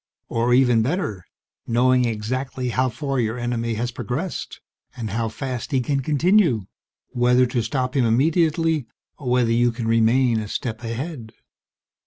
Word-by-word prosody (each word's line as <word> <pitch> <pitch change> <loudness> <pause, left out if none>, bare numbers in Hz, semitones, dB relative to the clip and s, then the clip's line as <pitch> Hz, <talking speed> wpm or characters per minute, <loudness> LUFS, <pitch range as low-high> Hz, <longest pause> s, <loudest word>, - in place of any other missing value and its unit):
"Or 115 +1 0
even 125 -2 +4
better: 110 - -2 0.4
knowing 125 +1 +3
exactly 125 +3 -3
how 130 +2 +1
far 135 +2 -3
your 115 0 -1
enemy 120 -1 -2
has 120 +3 -2
progressed 145 +9 -4 0.4
and 110 -4 -4
how 115 +1 -1
fast 130 +4 -5
he 135 - +2
can 135 +3 0
continue, 155 - +2 0.4
whether 125 +1 +3
to 125 -1 -1
stop 130 +2 -2
him 130 -3 +3
immediately 155 +3 +2 0.3
or 135 -4 -4
whether 125 -2 +2
you 120 +1 +3
can 115 0 -4
remain 115 +1 +3
a 105 - -5
step 110 +2 -4
ahead." 115 0 -5
125 Hz, 150 wpm, -22 LUFS, 115-135 Hz, 0.4 s, even